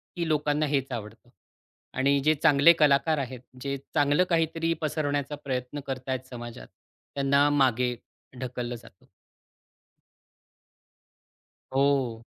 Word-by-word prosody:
की 170 -2 -2
लोकांना 150 0 +1
हेच 135 -2 -1
आवडतं 115 +1 -7 0.7
आणि 140 +1 +3
जे 155 - +5
चांगले 150 +2 +7
कलाकार 150 +1 +4
आहेत, 130 -2 -4 0.2
जे 140 0 -3 0.2
चांगलं 145 +3 +3
काहीतरी 165 0 +1
पसरवण्याचा 145 -2 -1
प्रयत्न 130 +1 -3
करतायत 130 0 -4
समाजात, 120 -1 -8 0.5
त्यांना 140 +1 +3
मागे 125 -3 +2 0.4
ढकललं 125 -1 -4
जातं. 115 -5 -16 2.7
हो. 135 -5 +1
140 Hz, 100 wpm, -27 LUFS, 125-150 Hz, 2.7 s, चांगले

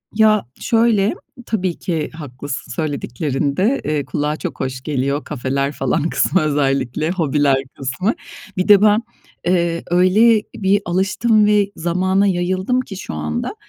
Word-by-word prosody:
Ya, 215 -1 +4
şöyle, 225 -3 +2 0.3
tabii 185 -7 -1
ki 160 -4 -2
haklısın 145 -4 -7
söylediklerinde, 145 - -1
eee, 150 -2 -1
kulağa 150 +3 -2
çok - - -6
hoş 130 0 -3
geliyor. 140 +1 -1
Kafeler 140 0 -2
falan 145 +3 -1
kısmı 185 - +2
özellikle, 140 -1 0
hobiler 145 -5 +1
kısmı. 135 - -1 0.4
Bir 185 - 0
de 205 -1 +7
ben, 210 +1 +4 0.4
eee, 170 -2 +1
öyle 210 +5 +4
bir 195 0 +2
alıştım 195 +5 +2
ve 205 -1 +3
zamana 185 +4 +1
yayıldım 185 +7 0
ki 195 -6 -9
şu 185 - -6
anda. 75 0 -3
170 Hz, 130 wpm, -19 LUFS, 140-200 Hz, 0.4 s, de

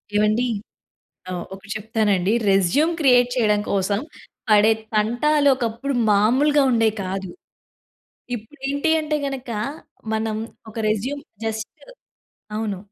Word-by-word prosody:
ఏవండీ! 215 +4 +2 0.8
ఆహ్, 175 -1 -3
ఒకటి 195 +2 -12
చెప్తారా 220 -1 0
అండి. 185 +5 +1 0.2
రెజ్యూమ్ 195 - +3
క్రియేట్ 245 -4 +5
చేయడం 210 -4 +2
కోసం, 200 +1 +1 0.5
పడే 215 +1 +6 0.2
తంటాలొకప్పుడు 260 +2 +2 0.2
మామూలుగా 265 +9 +4
ఉండేయి 225 -2 +3
కాదు. 190 0 -4 1.1
ఇప్పుడేంటి 275 +6 -3
అంటే 305 0 -1
గనకా, 255 -5 -4 0.5
మనం 220 0 -1 0.3
ఒక - - -15
రెజ్యూమ్ 255 +7 -2 0.2
జస్టు 220 0 -3 0.9
అవును. 215 -3 -2
220 Hz, 100 wpm, -22 LUFS, 210-270 Hz, 1.1 s, పడే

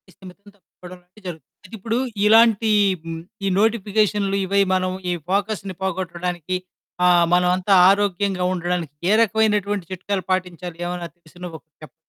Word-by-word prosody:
స్థిమితం 190 +1 -15
తప్పిపోడంలాంటియి 180 +1 -16
జరుగుతుంది. 160 -6 -9
అయితె, 185 - -10
ఇప్పుడూ 225 +3 -2 0.3
ఇలాంటీ 225 0 +5 0.3
హ్మ్, 165 0 -6 0.2
ఈ - - +1
నోటిఫికేషన్లు, 210 -2 +1
ఇవి, 200 +1 +2
మనం 185 0 0 0.2
ఈ - - +1 0.2
ఫోకస్‌ని 200 -1 -2
పోగొట్టడానికి 180 -1 -3 0.5
ఆహ్, 175 -1 +5
మనవంతా 180 +2 +2 0.2
ఆరోగ్యంగా 195 -2 +1
ఉండడానికి 175 -4 -3 0.2
ఏ - - +4
రకమైనటువంటి 210 -3 +1
చిట్కాలు 190 +1 -3
పాటించాలి 180 -2 -3
ఏవన్నా 175 -1 -4
తెలిసిన 175 +1 -11
ఒకటి 160 0 -27
చెప్పండి. 155 - -13
185 Hz, 130 wpm, -21 LUFS, 180-205 Hz, 0.5 s, ఇలాంటీ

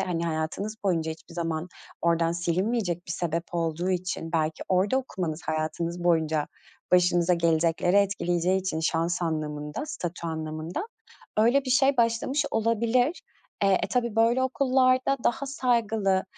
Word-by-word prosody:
hani, 170 -2 -1
hayatınız 165 +7 -3
boyunca 165 -4 +1
hiçbir 160 +1 -10
zaman 165 0 -2 0.3
oradan 165 0 +2
silinmeyecek 175 +2 -1
bir 170 - -3
sebep 170 -1 -2
olduğu 170 +2 -1
için, 180 -2 -3
belki 155 -1 0
orada 190 +7 +2
okumanız 180 -10 -4
hayatınız 165 +2 -2
boyunca 160 -3 +2 0.5
başınıza 180 -1 +4
gelecekleri 170 +2 +2
etkileyeceği 185 -2 +2
için 185 -4 -2
şans 165 +2 0
anlamında, 150 - -3
statü 175 - -5
anlamında 160 - -4 0.5
öyle 245 +6 +4
bir 255 - -3
şey 270 +1 +4
başlamış 235 +5 +1
olabilir. 230 +6 +1 0.4
Eee, 195 -1 +4
e, - - +1
tabii, 235 -3 -1
böyle 235 +3 +3
okullarda 260 0 +2
daha 255 +4 +1
saygılı, 225 -7 +1
180 Hz, 130 wpm, -27 LUFS, 165-230 Hz, 0.5 s, başınıza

